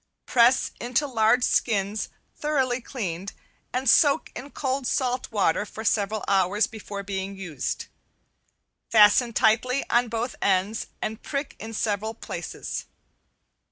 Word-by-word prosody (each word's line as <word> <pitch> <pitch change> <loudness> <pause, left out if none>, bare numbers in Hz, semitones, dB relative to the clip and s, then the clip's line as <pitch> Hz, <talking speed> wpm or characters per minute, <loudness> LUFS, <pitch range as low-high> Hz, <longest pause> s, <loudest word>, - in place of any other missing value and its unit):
Press 245 +1 +4
into 250 +5 0
large 245 -1 +3
skins 210 -3 +1 0.3
thoroughly 265 -4 0
cleaned 195 -7 -5 0.4
and 255 +2 -2
soaked 285 +5 +4
in 275 - -7
cold 265 -2 -2
salt 250 -2 -1
water 205 -3 +2
for 220 +1 -8
several 215 -1 0
hours 195 +2 +3
before 205 -2 -7
being 195 0 -4
used, 175 -8 -4 1.0
fasten 220 +2 +6
tightly 235 +4 +2
on 240 +1 +3
both 230 +2 -3
ends 195 +3 +1 0.2
and 220 +2 -4
prick 280 0 -4
in 220 - -7
several 215 +1 -1
places. - - -6
220 Hz, 125 wpm, -25 LUFS, 200-250 Hz, 1.0 s, fasten